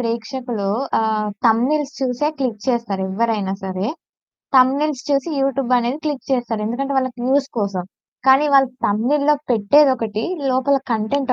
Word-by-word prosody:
ప్రేక్షకులు 230 -2 -3 0.3
ఆహ్, 215 -1 0 0.2
థంబ్‌నెయిల్స్ 270 +6 +2
చూసే 260 +3 0
క్లిక్ 235 -6 -3
చేస్తారు 230 -6 -1
ఎవ్వరైనా 205 -2 -1
సరే. 190 +1 -3 0.7
థంబ్‌నెయిల్స్ 270 +2 +3
చూసి 280 +4 +1
యూటూబ్ 270 -2 0
అనేది 245 +4 -2
క్లిక్ 295 -2 -3
చేస్తారు 235 -4 -1
ఎందుకంటే 270 +5 -2
వాళ్ళకి 255 -2 -3
వ్యూస్ 275 +1 +2
కోసం. 200 -4 -2 0.4
కానీ 270 +3 +6
వాళ్ళు 270 -2 +5 0.2
థంబ్‌నెయిల్‌లో 280 +8 +2 0.2
పెట్టేదొకటి, 230 -1 +3 0.3
లోపల 260 +2 +2 0.2
కంటెంట్ 255 +5 0
250 Hz, 125 wpm, -20 LUFS, 220-275 Hz, 0.7 s, కానీ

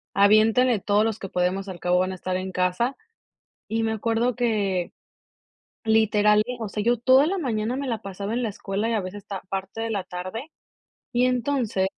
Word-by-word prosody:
"Aviéntele 215 +4 +5
todos 205 +2 +2
los 225 -1 -2
que 195 - -6
podemos 185 +3 -1
al 180 -2 -7
cabo 180 0 +2
van 185 +1 0
a - - -5
estar 185 0 -3
en 185 0 -4
casa". 185 +8 0 0.7
Y 225 +1 0
me 220 - 0
acuerdo 230 +3 0
que 205 -7 0 1.0
literal, 210 -1 +4 0.2
o 220 - -3
sea, 210 +1 -3
yo 240 +2 +3
toda 260 +4 +5
la 390 +3 -1
mañana 235 - -1
me 280 0 -3
la 230 -4 -2
pasaba 200 +2 -5
en 245 - 0
la 225 - 0
escuela 200 +2 -3
y - - 0
a 220 - +1
veces 185 +2 -6
está 195 -1 -6
parte 195 +2 -4
de 225 - -2
la 200 -4 -1
tarde. 185 - -6 0.6
Y 245 0 +3
entonces, 245 -6 0
215 Hz, 195 wpm, -25 LUFS, 190-235 Hz, 1.0 s, Aviéntele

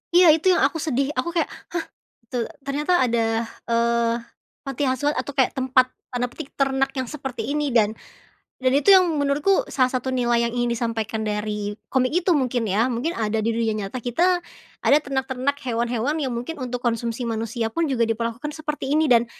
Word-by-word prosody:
Iya 360 0 +8
itu 325 +3 -2
yang 345 - +2
aku - - 0
sedih, 275 -3 0
aku 340 - 0
kayak, 335 - +1 0.2
"Hah, 335 -2 -2 0.4
te 250 - -5 0.2
ternyata 285 +5 -1
ada, 235 -1 +1 0.4
eee, 235 0 +1 0.4
panti 275 0 -4
asuhan 275 +3 0
atau 285 - -3
kayak 270 0 +1
tempat, 255 -1 +3 0.2
tanda 245 0 0
petik, 280 +3 -9
'ternak' 270 0 +1
yang 260 -2 -3
seperti 265 -6 -5
ini." 290 -2 0
Dan, 220 -2 +3 0.7
dan 255 0 +3
itu 390 +6 +6
yang 365 -2 +5
menurutku 285 +7 +2
salah 255 -2 +1
satu 260 0 -2
nilai 240 -1 +2
yang 235 - -3
ingin 240 0 0
disampaikan 225 -2 -2
dari 210 -1 -2 0.2
komik 260 +2 +1
itu, 360 +1 +2
mungkin 255 -6 +2
ya, 215 +6 +3
mungkin 255 +6 -1
ada 220 0 0
di 225 - +1
dunia 225 -1 0
nyata 210 +3 -4
kita, 245 +6 -1 0.6
ada 285 - +7
ternak-ternak 265 0 -1
hewan-hewan 240 +3 0
yang 265 - -1
mungkin 245 +5 -4
untuk 250 0 -3
konsumsi 235 0 -2
manusia 230 0 -2
pun 330 -3 0
juga 235 -3 +2
diperlakukan 230 +6 -3
seperti 300 -3 -3
ini, 310 -2 +3
dan 235 -1 +5
255 Hz, 180 wpm, -23 LUFS, 235-285 Hz, 0.7 s, Iya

